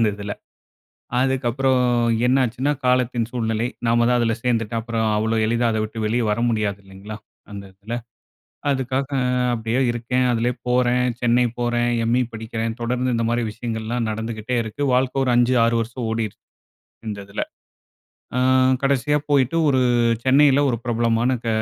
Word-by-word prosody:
அந்த 115 - +4
இதுல. 100 0 -5 0.9
அதுக்கப்பறம் 130 0 +1 0.5
என்னாச்சுன்னா, 130 +1 +1
காலத்தின் 125 -2 +1
சூழ்நிலை, 115 -1 -1 0.2
நாம 120 0 +3
தான் 125 - +3
அதுல 115 -1 +1
சேர்ந்துட்டோம். 115 -2 0
அப்புறம் 115 -1 -1
அவ்வளோ 110 +1 0
எளிதா 120 +1 +1
அதை 110 - -1
விட்டு 110 +1 -6
வெளிய 115 +2 +1
வர 105 - -1
முடியாது 105 -3 -1
இல்லைங்களா? 95 +2 -10 0.4
அந்த 100 -1 -7
இதுல. 105 +5 -6 0.7
அதுக்காக 130 0 -1 0.5
அப்படியே 115 +2 -1
இருக்கேன். 125 +2 -1
அதுலே 120 +1 +1 0.2
போறேன். 125 0 +2 0.2
சென்னை 120 +1 +3 0.2
போறேன். 120 0 +1 0.2
எம்.இ. 120 +2 +2
படிக்கிறேன். 115 0 -4
தொடர்ந்து 125 +1 -1
இந்த 115 - 0
மாரி 120 +1 0
விஷயங்கள்லாம் 115 +1 -3
நடந்துக்கிட்டே 110 +2 -3
இருக்கு. 110 +6 -7
வாழ்க்கை 130 +1 +1
ஒரு 125 - +1
5 120 +1 +3
6 115 - +1
வருஷம் 115 +1 -5
ஓடிருச்சு, 110 -2 -3 0.7
இந்த 105 - -5
இதுல. 100 - -3 0.9
அ - - +2 0.4
கடைசியா 140 +2 +2
போயிட்டு 140 0 +2
ஒரு 130 -2 +2 0.4
சென்னையில 140 +1 +5
1 120 - 0
பிரபலமான 115 0 +1
க - - -2
120 Hz, 145 wpm, -22 LUFS, 110-125 Hz, 0.9 s, சென்னையில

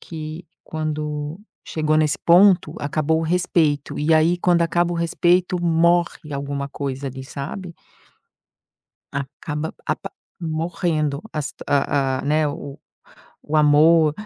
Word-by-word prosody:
que 160 +1 -7 0.2
quando 150 0 -4 0.3
chegou 155 -1 0
nesse 155 -1 +2
ponto, 175 -2 +5
acabou 155 +2 0
o - - -2
respeito, 160 -4 +1
e 155 +2 +2
aí 160 +2 +4
quando 175 -1 +3
acaba 175 +1 +1
o - - -2
respeito, 175 +2 +1
morre 170 -2 +2
alguma 140 0 -3
coisa 140 -1 -4
ali, 130 0 -6
sabe? 170 +7 -6 1.4
Acaba 150 +3 -4
apa - - -2 0.3
morrendo 160 -2 -1 0.2
as 150 -2 -2 0.2
a 135 -2 +1
a - - -9
né, 150 +1 +2
o 145 -1 -7 0.6
o 155 +1 -2
amor, 155 +1 +5
155 Hz, 120 wpm, -22 LUFS, 145-170 Hz, 1.4 s, ponto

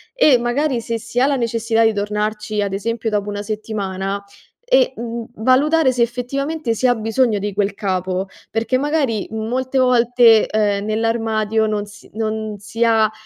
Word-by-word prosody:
e 305 - +5
magari 240 +2 0
se 230 0 -3
si 230 +2 -3
ha 260 - +4
la 280 - +1
necessità 230 -2 0
di 225 -1 +3
tornarci, 210 +1 -2
ad 200 - -1
esempio 225 +3 -2
dopo 205 -1 -1
1 205 0 -4
settimana 200 -2 -4 0.4
e, - - +3
mhmm, 235 0 -5
valutare 265 +5 +3
se 245 - -1
effettivamente 250 +3 -2
si 255 +3 +1
ha 245 - +3
bisogno 225 0 +1
di 205 0 -3
quel 200 0 0
capo. 185 -2 -2 0.2
Perché 230 +3 0
magari 275 -6 0
molte 250 +4 -2
volte, 240 -2 +5
ehm, 205 -1 0
nell'armadio 220 0 0
non 210 -1 -2
si 205 +1 -15
non 220 -1 -3
si 225 +3 -3
ha, 220 -2 +3
225 Hz, 165 wpm, -19 LUFS, 210-245 Hz, 0.4 s, e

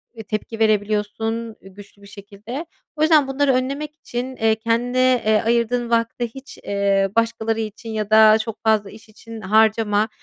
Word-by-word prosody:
e, 225 - -8
tepki 215 +2 -5
verebiliyorsun 215 +1 -1
güçlü 200 +1 -15
bir 200 - -14
şekilde. 205 - -9 0.3
O 305 - -5
yüzden 310 -3 +4
bunları 270 0 +1
önlemek 280 +4 -2
için, 255 -3 -6
eee, 225 -2 +2
kendine, 245 +3 +1
eee, 215 0 +3
ayırdığın 235 +1 0
vakti 230 +1 0
hiç, 270 +1 -11
eee, 200 -1 +1
başkaları 230 -1 0
için 220 +1 -6
ya 215 -2 -3
da 215 0 +7
çok 220 0 -6
fazla 215 -2 +2
iş 220 +1 -15
için 225 +1 -11
harcama. 215 +1 +2
225 Hz, 160 wpm, -21 LUFS, 215-240 Hz, 0.3 s, da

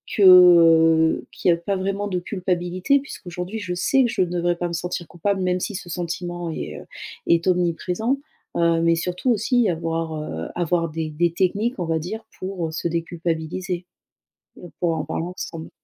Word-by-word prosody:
que, 205 - +3
heu 165 -3 +7
qu'il - - 0
y - - +7
a 170 - -1
pas 195 +4 -2
vraiment 195 +2 -2
de 180 -2 -1
culpabilité, 185 +7 0
puisqu'aujourd'hui 190 -5 -6
je 180 -3 -4
sais 220 +9 +3
que 240 - +1
je 210 -5 0
ne 180 - +2
devrais 175 0 +1
pas 175 - -1
me 170 - -5
sentir 175 0 -3
coupable 190 +3 -1
même 180 0 +1
si 205 - -3
ce 180 - -7
sentiment 175 0 -4
est, - - -5
heu, - - -14 0.4
est 170 +1 +3
omniprésent, 180 +7 +1 0.4
heu, 170 -1 +3
mais 165 0 +3
surtout 180 +9 -1
aussi 230 0 +2
avoir, 165 -1 -2
heu, 80 - -5
avoir 170 -1 0
des 155 0 -4
des 170 +2 +1
techniques 205 +7 0
on 175 - -1
va 160 0 0
dire 215 +7 -6
pour, 185 -3 -3
heu, - - -7
se 165 - -2
déculpabiliser. 170 +2 -3 0.8
On 175 - -10
pourrait 165 -2 +1
en - - -7
parler 165 - -3
ensemble. 165 -2 -7
175 Hz, 190 wpm, -23 LUFS, 165-185 Hz, 0.8 s, heu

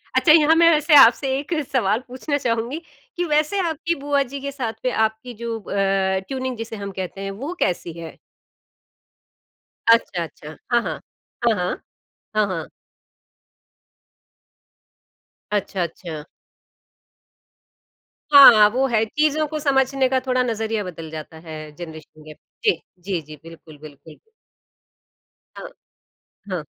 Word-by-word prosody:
अच्छा, 305 - +5
यहाँ 320 0 +6
मैं 335 0 +6
वैसे 305 0 +4
आपसे 240 +2 +5
एक 295 +4 -5 0.2
सवाल 220 -4 +1
पूछना 260 +4 -3
चाहूँगी। 245 +4 -2 0.4
कि 355 - 0
वैसे 305 +5 +1
आपकी 330 +2 -2
बुआ 285 0 +1
जी 275 +2 -8
के 280 0 -4
साथ 250 -5 -4
में 255 - +2
आपकी 220 +2 -1
जो 230 0 -5
अ, 200 - -8 0.5
ट्यूनिंग 260 -2 -4
जिसे 225 0 -6
हम 200 -1 -6
कहते 190 +1 -6
हैं, 195 0 -4
वो 275 - -6
कैसी 175 -2 -1
है? 165 -1 -9 1.8
अच्छा, 185 -6 0
अच्छा। 155 -1 -10 0.2
हाँ, 240 0 +4
हाँ। - - -5 0.5
हाँ, 225 - +4
हाँ। 180 -1 -1 0.6
हाँ, 210 -1 +3
हाँ। 170 -5 -4 2.8
अच्छा, 200 -2 -1
अच्छा। 165 -2 -7 2.1
हाँ, 230 -7 +10
वो 255 +5 0
है 225 -3 +1
चीज़ों 305 +5 +1
को 310 +1 -4
समझने 270 -1 +2
का 265 - +2
थोड़ा 255 -1 +1
नज़रिया 220 -2 -2
बदल 165 -3 -8
जाता 160 0 -8
है 155 -1 -8
जनरेशन 155 -2 -11
गैप 155 0 -12 0.3
जी, 430 - +5 0.3
जी, 180 -2 -3
जी। 155 +1 -12
बिल्कुल, 165 -2 -14
बिल्कुल। 150 +1 -14 1.4
हाँ। - - -8 0.8
हाँ। 175 -4 -3
225 Hz, 130 wpm, -22 LUFS, 175-280 Hz, 2.8 s, हाँ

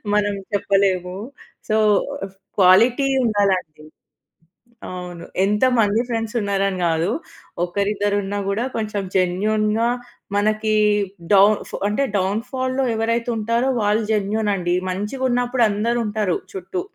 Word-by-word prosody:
మనం 205 -1 +2 0.2
చెప్పలేము. 190 -2 +1 0.5
So, 215 - +3 0.8
quality 230 +9 +5 0.2
ఉండాలండి. 190 -8 0 1.0
అవును. 180 -2 -7 0.2
ఎంతమంది 220 0 +2
ఫ్రెండ్స్ 225 0 -3
ఉన్నారని 195 -2 0
కాదు. 165 +1 +1 0.6
ఒకరిద్దరు 205 +3 0
ఉన్నా 205 +1 -3
కూడా 210 +4 0
కొంచెం 215 -2 -2
జెన్యూన్‌గా 215 +5 +1 0.5
మనకి 215 +1 +1 0.6
డౌన్ 200 +2 +6
ఫ్ - - -16
అంటే, 210 +7 0
డౌన్ 195 +3 0
ఫాల్‌లో 260 0 -1
ఎవరైతే 230 +2 0
ఉంటారో 230 +4 0
వాళ్ళు 210 +2 +2
జెన్యూన్ 210 +1 0
అండి. 175 -2 0 0.2
మంచిగా 210 +8 -3
ఉన్నప్పుడు 245 0 +2
అందరూ 230 +4 0
ఉంటారు 210 -4 0 0.2
చుట్టూ. 185 -1 -4
205 Hz, 110 wpm, -21 LUFS, 195-225 Hz, 1.0 s, డౌన్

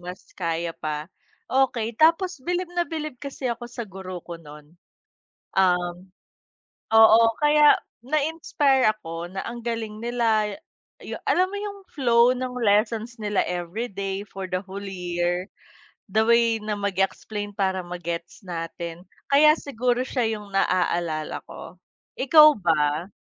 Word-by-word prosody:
mas 180 +1 -9
kaya 170 -1 -2
pa, 150 0 -4 0.4
okey 240 -4 +1
tapos 335 +5 +3
bilib 355 0 -1
na 350 - +2
bilib 305 -4 -5
kasi 275 -2 -4
ako 235 +1 -5
sa 235 - -5
guro 185 -1 -7
ko 170 - -7
nun. 150 +1 -14 0.8
Um, 180 0 +1 0.8
oo 225 0 +8 0.2
kaya 295 0 +6 0.3
na-inspire 290 -2 +1
ako 170 -5 -6
na 190 - -4
ang 235 +1 -6
galing 225 -2 -3
nila 225 -3 +1
ya - - -10 0.5
yu - - -6
alam 365 - +4
mo - - -3
yung 405 -1 -6
flow 240 -3 +4
ng 255 0 -4
lessons 225 +2 +1
nila 205 -1 0
every 180 +7 -3
day 195 0 -4
for 195 -1 -7
the 185 - -1
whole 195 +1 -7
year, 180 -1 -2 0.6
the 220 +2 +3
way 235 0 +4
na 210 0 -2
mag-explain 200 +1 -2
para 190 -2 0
ma-gets 175 +2 -6
natin. 170 0 -6 0.3
Kaya 305 +2 +7
siguro 250 -2 -1
siya 250 -2 -1
yung 205 -1 -12
na-aalala 175 -5 0
ko. 180 - -10 0.4
Ikaw 305 +3 +8
ba? 160 -1 +1
210 Hz, 135 wpm, -24 LUFS, 180-250 Hz, 0.8 s, oo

